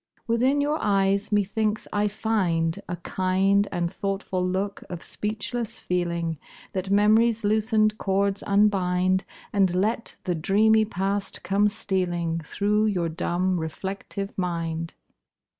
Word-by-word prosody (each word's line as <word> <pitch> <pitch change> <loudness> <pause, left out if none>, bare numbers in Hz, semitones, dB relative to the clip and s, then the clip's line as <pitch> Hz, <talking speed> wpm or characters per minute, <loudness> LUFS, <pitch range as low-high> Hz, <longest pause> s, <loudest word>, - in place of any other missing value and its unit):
Within 255 +5 +2
your 295 +2 0
eyes 200 0 +1
methinks 210 +1 0
I 205 0 +2
find 195 -5 0
A 175 - -2
kind 190 +3 +1
And 175 -2 -2
thoughtful 195 -2 -2
look 190 +2 -2
of 175 -2 -6
speechless 215 +2 -3
feeling 170 -3 -2 0.3
That 190 0 -2
mem'ry's 215 +3 +4
loosened 215 0 +2
cords 200 0 0
unbind, 190 -2 +2 0.3
And 190 -3 +3
let 220 +5 0
the 180 - -1
dreamy 215 +6 +3
past 195 0 -2
come 205 +2 +2
stealing 175 -5 -1
Through 210 +6 +1
your 180 -5 0
dumb, 180 +2 -1
reflective 195 +4 -5
mind. 165 -2 -3
195 Hz, 120 wpm, -25 LUFS, 180-210 Hz, 0.3 s, mem'ry's